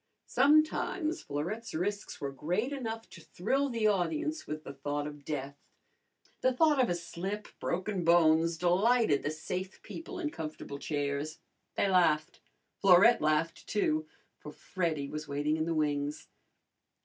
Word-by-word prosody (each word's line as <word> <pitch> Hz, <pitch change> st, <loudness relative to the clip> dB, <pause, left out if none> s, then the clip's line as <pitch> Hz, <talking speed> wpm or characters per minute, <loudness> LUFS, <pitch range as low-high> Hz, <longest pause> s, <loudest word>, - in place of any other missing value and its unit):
Sometimes 310 Hz, +4 st, +2 dB
Florette's 175 Hz, +11 st, -4 dB
risks 200 Hz, +5 st, -3 dB
were 140 Hz, -1 st, -3 dB
great 180 Hz, -, -1 dB
enough 225 Hz, -4 st, -4 dB
to 170 Hz, -, -12 dB
thrill 270 Hz, -, -1 dB
the 230 Hz, -3 st, -1 dB
audience 305 Hz, -, 0 dB
with 155 Hz, 0 st, -5 dB
the 140 Hz, -, -8 dB
thought 145 Hz, +1 st, -3 dB
of 145 Hz, -1 st, -8 dB
death. 140 Hz, -1 st, -5 dB, 0.8 s
The 255 Hz, -, +3 dB
thought 295 Hz, +1 st, +4 dB
of 245 Hz, -, +2 dB
a 175 Hz, -, +1 dB
slip, 180 Hz, +5 st, -5 dB
broken 185 Hz, +1 st, -2 dB
bones, 165 Hz, 0 st, +4 dB
delighted 185 Hz, -, +3 dB
the -, -, -2 dB
safe 180 Hz, +5 st, -5 dB
people 350 Hz, +3 st, -8 dB
in 315 Hz, -4 st, -2 dB
comfortable 155 Hz, -, -6 dB
chairs. 145 Hz, +1 st, -2 dB, 0.4 s
They -, -, +2 dB
laughed. 170 Hz, -4 st, +2 dB, 0.4 s
Florette 195 Hz, +5 st, +6 dB
laughed, 155 Hz, +2 st, 0 dB
too, 155 Hz, -7 st, 0 dB, 0.3 s
for 150 Hz, -, -9 dB
Freddy 160 Hz, -4 st, -2 dB
was 150 Hz, +1 st, -6 dB
waiting 145 Hz, +2 st, 0 dB
in 160 Hz, 0 st, -1 dB
the 165 Hz, 0 st, -1 dB
wings. 145 Hz, -1 st, -1 dB
170 Hz, 145 wpm, -31 LUFS, 150-225 Hz, 0.8 s, Florette